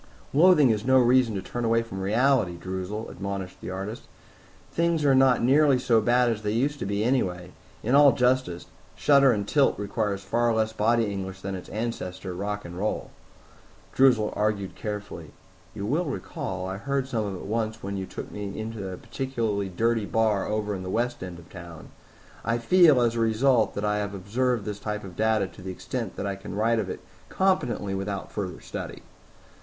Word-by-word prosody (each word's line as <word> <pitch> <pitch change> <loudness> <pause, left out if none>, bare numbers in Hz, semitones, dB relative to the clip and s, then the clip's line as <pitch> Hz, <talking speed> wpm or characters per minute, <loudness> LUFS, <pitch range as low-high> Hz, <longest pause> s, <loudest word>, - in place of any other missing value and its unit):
"Loathing 150 -4 +6
is 105 -1 -1
no 130 +2 +4
reason 125 -2 +4
to 95 - -3
turn 120 +5 -4
away 115 0 +2
from 95 -4 -7
reality, 110 -2 +2
Droozle," 95 +4 -5
admonished 95 -1 -5
the - - -6
artist. 95 +4 -6 0.6
"Things 170 -2 +1
are 140 - +5
not 130 -2 +4
nearly 140 +2 +5
so 115 -3 +3
bad 120 +3 +3
as 110 -1 -3
they 105 -1 -1
used 140 +5 0
to - - -3
be 100 +1 0
anyway. 90 -8 0 0.3
In 120 - 0
all 140 0 +8
justice, 125 -9 +1 0.3
shudder 140 -2 +5
and 105 -3 -1
tilt 140 +2 +3
requires 100 -1 -2
far 120 +3 +1
less 110 0 0
body 115 +2 +2
English 95 -2 -5
than 100 0 -4
its 95 - -7
ancestor, 95 -4 -4
rock 100 +3 -4
and 85 +1 -7
roll." 105 +2 -2 0.8
Droozle 125 -5 +4
argued 105 -2 -1
carefully, 105 -7 -6 0.4
"You 100 - -4
will 150 +11 0
recall 95 - -4
I 95 +1 -4
heard 135 +4 -2
some 115 -5 -1
of 100 - -4
it - - -8
once 110 +1 -2
when 100 +1 -3
you 95 -1 -4
took - - -8
me 100 -1 -5
into 110 -3 -5
a 90 - -6
particularly 115 -5 -2
dirty 115 +3 0
bar 110 -3 +1
over 105 -1 -1
in 95 - -4
the 95 - -5
west 120 +4 -1
end 90 -2 -6
of 85 -1 -14
town. 85 -3 -10 0.5
I 115 +1 0
feel, 150 +2 +5
as 120 -1 +2
a 115 - -2
result, 115 0 +2
that 100 - -2
I 105 0 +1
have 100 -1 -3
observed 115 +3 -1
this 105 -1 -4
type 105 0 -4
of 95 -3 -9
data 110 -1 +2
to 85 - -14
the 95 - -6
extent 110 +3 -5
that - - -4
I 100 -1 -2
can 95 0 -8
write 115 +2 +2
of 100 -4 -2
it - - -6 0.3
competently 125 - 0
without 95 0 -4
further 95 -5 -5
study." - - -7
110 Hz, 195 wpm, -26 LUFS, 95-120 Hz, 0.8 s, all